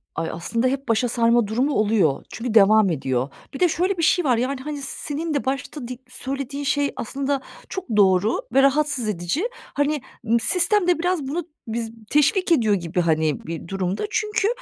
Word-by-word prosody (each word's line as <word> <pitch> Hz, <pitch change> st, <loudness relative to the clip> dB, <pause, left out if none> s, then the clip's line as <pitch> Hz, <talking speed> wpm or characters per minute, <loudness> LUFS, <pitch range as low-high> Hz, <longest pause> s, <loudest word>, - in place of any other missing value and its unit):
Ay, 165 Hz, -, -2 dB
aslında 230 Hz, +9 st, -1 dB
hep 275 Hz, 0 st, -2 dB
başa 230 Hz, +2 st, +2 dB
sarma 235 Hz, -1 st, +3 dB
durumu 255 Hz, +7 st, 0 dB
oluyor. 205 Hz, -9 st, +2 dB
Çünkü 235 Hz, -1 st, -4 dB
devam 215 Hz, -1 st, +6 dB
ediyor. 130 Hz, -4 st, -1 dB, 0.2 s
Bir -, -, -6 dB
de 360 Hz, -, +4 dB
şöyle 365 Hz, +4 st, 0 dB
bir 335 Hz, -, -1 dB
şey 355 Hz, +1 st, +3 dB
var: 250 Hz, -4 st, +3 dB
Yani, 260 Hz, +2 st, -1 dB
hani, 290 Hz, 0 st, -5 dB
senin 300 Hz, +3 st, -4 dB
de 285 Hz, -, -1 dB
başta 270 Hz, -1 st, -3 dB
di 255 Hz, -, -6 dB
söylediğin 275 Hz, +2 st, -4 dB
şey 285 Hz, 0 st, +1 dB
aslında 275 Hz, +3 st, -2 dB, 0.3 s
çok 380 Hz, -1 st, -5 dB
doğru 195 Hz, +2 st, +4 dB
ve 270 Hz, -, +6 dB
rahatsız 275 Hz, -4 st, +2 dB
edici. 190 Hz, -, -1 dB, 0.3 s
Hani, 290 Hz, 0 st, 0 dB, 0.2 s
ımm, 230 Hz, +1 st, +3 dB
sistem 360 Hz, -, +2 dB
de 350 Hz, -2 st, +3 dB
biraz 350 Hz, -5 st, 0 dB
bunu 325 Hz, +3 st, -3 dB, 0.2 s
bize 225 Hz, 0 st, -3 dB, 0.2 s
teşvik 340 Hz, +5 st, +2 dB
ediyor 225 Hz, -9 st, +4 dB
gibi, 175 Hz, -1 st, -1 dB
hani, 155 Hz, -3 st, +1 dB
bir 165 Hz, +1 st, -6 dB
durumda. 195 Hz, -, -2 dB
Çünkü, 425 Hz, -2 st, 0 dB
255 Hz, 180 wpm, -23 LUFS, 210-295 Hz, 0.3 s, devam